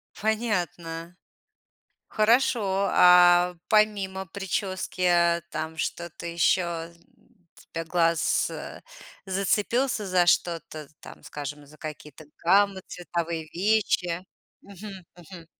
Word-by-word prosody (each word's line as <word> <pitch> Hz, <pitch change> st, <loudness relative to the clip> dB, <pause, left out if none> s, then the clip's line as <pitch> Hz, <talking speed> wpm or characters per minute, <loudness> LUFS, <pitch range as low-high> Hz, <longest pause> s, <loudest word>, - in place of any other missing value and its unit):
Понятно. 180 Hz, -6 st, -2 dB, 0.9 s
Хорошо, 215 Hz, -3 st, +2 dB
а 180 Hz, 0 st, +6 dB
помимо 200 Hz, -3 st, +1 dB
причёски, 190 Hz, 0 st, -4 dB
а, 170 Hz, -1 st, +3 dB
там 160 Hz, +1 st, -5 dB
что-то 170 Hz, +1 st, -5 dB
еще, 170 Hz, 0 st, 0 dB, 0.8 s
для 165 Hz, 0 st, -3 dB
глаз, 165 Hz, -1 st, +1 dB
э, -, -, -8 dB, 0.4 s
зацепился 210 Hz, +5 st, 0 dB
за 180 Hz, -2 st, +3 dB
что-то, 165 Hz, -4 st, 0 dB
там, -, -, -13 dB
скажем, 145 Hz, 0 st, -7 dB
за 150 Hz, +2 st, -17 dB
какие-то 150 Hz, -1 st, -9 dB, 0.2 s
гаммы 195 Hz, +2 st, +3 dB
цветовые, 170 Hz, -2 st, -4 dB
вещи? 185 Hz, -2 st, 0 dB, 0.4 s
Мгм, 195 Hz, -2 st, -11 dB
мгм. 170 Hz, -1 st, -13 dB
180 Hz, 90 wpm, -26 LUFS, 165-195 Hz, 0.9 s, а